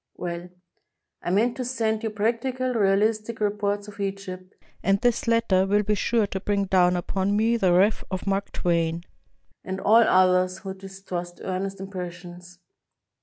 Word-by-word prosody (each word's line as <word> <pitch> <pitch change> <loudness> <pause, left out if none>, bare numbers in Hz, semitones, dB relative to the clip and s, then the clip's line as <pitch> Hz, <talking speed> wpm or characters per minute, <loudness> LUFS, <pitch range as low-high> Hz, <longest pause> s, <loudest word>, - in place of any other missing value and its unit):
Well: 175 0 -5 0.7
I - - -3
meant 225 +6 +2
to 255 - -2
send 225 -3 -1
you 225 - -2
practical, 245 +4 -1
realistic 215 +2 +1
reports 205 0 -1
of 210 0 -12
Egypt, 195 -2 -5 0.3
and 195 0 +2
this 240 +1 +1
letter 230 -5 +3
will 205 +1 +2
be 210 +1 +1
sure 220 +2 +1
to 195 -1 -4
bring 200 0 0
down 180 -1 +3
upon 190 +3 -1
me 225 +2 +2
the 190 -6 +2
wrath 195 +5 +3
of 185 -2 -4
Mark 195 0 -1
Twain, 170 -1 0 0.6
and 190 0 -4
all 220 +2 +5
others 185 -2 +3
who 190 0 -6
dis 195 0 -12
trust 175 -1 -5
earnest 190 +1 -3
impressions. 180 -2 -8
195 Hz, 160 wpm, -25 LUFS, 185-215 Hz, 0.7 s, all